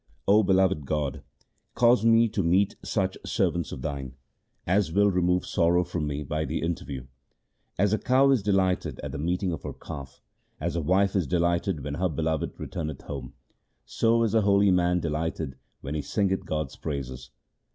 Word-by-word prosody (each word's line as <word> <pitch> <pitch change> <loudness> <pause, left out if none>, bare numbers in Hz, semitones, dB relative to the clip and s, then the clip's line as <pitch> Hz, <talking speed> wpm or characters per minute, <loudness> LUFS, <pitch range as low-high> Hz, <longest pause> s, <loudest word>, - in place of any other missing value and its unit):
O 105 +2 +6
beloved 95 -7 +2
God, 75 -4 -2 0.5
cause 120 -2 +4
me 115 0 +5
to 105 -1 -1
meet 95 +3 +2
such - - -1
servants 85 -2 0
of 65 - -7
Thine 65 -3 -4 0.5
As 95 -1 +2
will 100 +3 +4
remove 90 0 +1
sorrow 85 0 +2
from 85 -3 -3
me 75 0 -3
by 75 +2 -2
the - - -3
interview. 70 -6 -4 0.7
As 100 +2 +2
a 110 - +2
cow 135 +2 +4
is 130 -5 +3
delighted 95 -2 0
at - - -5
the - - -5
meeting 90 +4 -1
of 80 - -4
her - - -6
calf, 70 -2 -9 0.4
As 85 +3 -2
a 85 - 0
wife 95 +5 +2
is 95 -5 +1
delighted 85 -2 0
when 75 0 -4
her 95 - +2
beloved 80 0 -2
returneth 75 -3 -5
home, 65 -4 -7 0.5
So 115 0 +2
is 115 - 0
a 110 - +4
holy 100 -1 +4
man 90 -1 +2
delighted 80 -3 -3 0.3
when 70 - -5
he 75 - -1
singeth 95 +5 -1
God's 75 -4 -3
praises. 65 -4 -5
85 Hz, 175 wpm, -27 LUFS, 75-100 Hz, 0.7 s, O